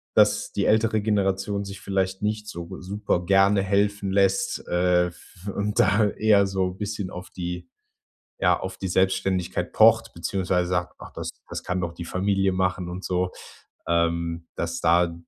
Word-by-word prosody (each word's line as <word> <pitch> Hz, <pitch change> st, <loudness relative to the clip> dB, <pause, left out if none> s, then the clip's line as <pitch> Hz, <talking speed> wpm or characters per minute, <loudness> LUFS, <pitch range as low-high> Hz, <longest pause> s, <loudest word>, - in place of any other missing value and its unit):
dass 105 Hz, 0 st, +3 dB
die 100 Hz, -, 0 dB
ältere 110 Hz, 0 st, +3 dB
Generation 100 Hz, -1 st, 0 dB
sich 100 Hz, 0 st, -8 dB
vielleicht 95 Hz, -1 st, -1 dB
nicht 105 Hz, 0 st, -2 dB
so 85 Hz, -1 st, -7 dB
super 95 Hz, -1 st, -2 dB
gerne 100 Hz, +1 st, +4 dB
helfen 100 Hz, 0 st, +1 dB
lässt, 95 Hz, 0 st, +1 dB
äh, 90 Hz, 0 st, +2 dB
f 90 Hz, +2 st, -10 dB
und 105 Hz, +1 st, -1 dB
da 100 Hz, +2 st, +4 dB
eher 105 Hz, -1 st, +3 dB
so 95 Hz, -1 st, -1 dB
bisschen 100 Hz, 0 st, -4 dB
auf 90 Hz, 0 st, -8 dB
die 90 Hz, -1 st, -5 dB, 0.7 s
ja, -, -, +3 dB
auf 95 Hz, 0 st, -5 dB
die 95 Hz, -, -3 dB
Selbständigkeit 95 Hz, 0 st, 0 dB
pocht, -, -, +5 dB
beziehungsweise 90 Hz, -2 st, -1 dB
sagt: 90 Hz, -1 st, -1 dB
„Och, -, -, -10 dB
das -, -, -4 dB, 0.2 s
das -, -, -5 dB
kann 90 Hz, 0 st, -1 dB
doch 85 Hz, -1 st, -3 dB
die 85 Hz, -, -7 dB
Familie 95 Hz, +1 st, +1 dB
machen“, 90 Hz, -1 st, -1 dB
und 90 Hz, +2 st, -6 dB
so. 90 Hz, 0 st, 0 dB, 0.6 s
Ähm, 85 Hz, 0 st, 0 dB
dass 85 Hz, 0 st, -3 dB
da 85 Hz, 0 st, +3 dB
95 Hz, 160 wpm, -25 LUFS, 90-100 Hz, 0.7 s, pocht